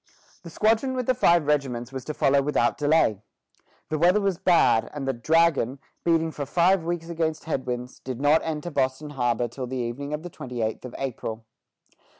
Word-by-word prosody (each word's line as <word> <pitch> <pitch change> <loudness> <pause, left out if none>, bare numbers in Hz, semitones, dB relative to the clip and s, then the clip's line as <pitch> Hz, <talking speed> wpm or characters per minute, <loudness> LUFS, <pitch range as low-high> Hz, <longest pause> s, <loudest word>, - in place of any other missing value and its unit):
The 170 - -10
squadron 225 +8 +1
with 255 -1 -2
the 255 - +3
five 175 -10 +3
regiments 135 -5 -1
was 130 -1 -5
to 155 - -5
follow 140 0 +3
without 135 -4 +1
delay. 145 -9 +2 0.7
The 155 - -1
weather 180 +5 +4
was 195 -4 -1
bad, 170 -10 +3
and 140 -2 -4
the 135 - +1
"Dragon," 145 -1 +2 0.3
beating 165 -1 +2
for 145 -3 -5
five 175 +3 +3
weeks 170 0 -3
against 160 -2 -2
headwinds, 125 -5 -4
did 130 -2 -6
not 145 +3 +4
enter 160 +1 -4
Boston 140 +1 -1
harbor 120 -3 0
till 125 +2 -6
the 130 +1 -4
evening 125 +4 -4
of 150 +1 -4
the 175 - -6
twenty 125 -5 -5
eighth 110 +3 -3
of 125 - -8
April. 115 -4 -5
145 Hz, 185 wpm, -25 LUFS, 125-165 Hz, 0.7 s, weather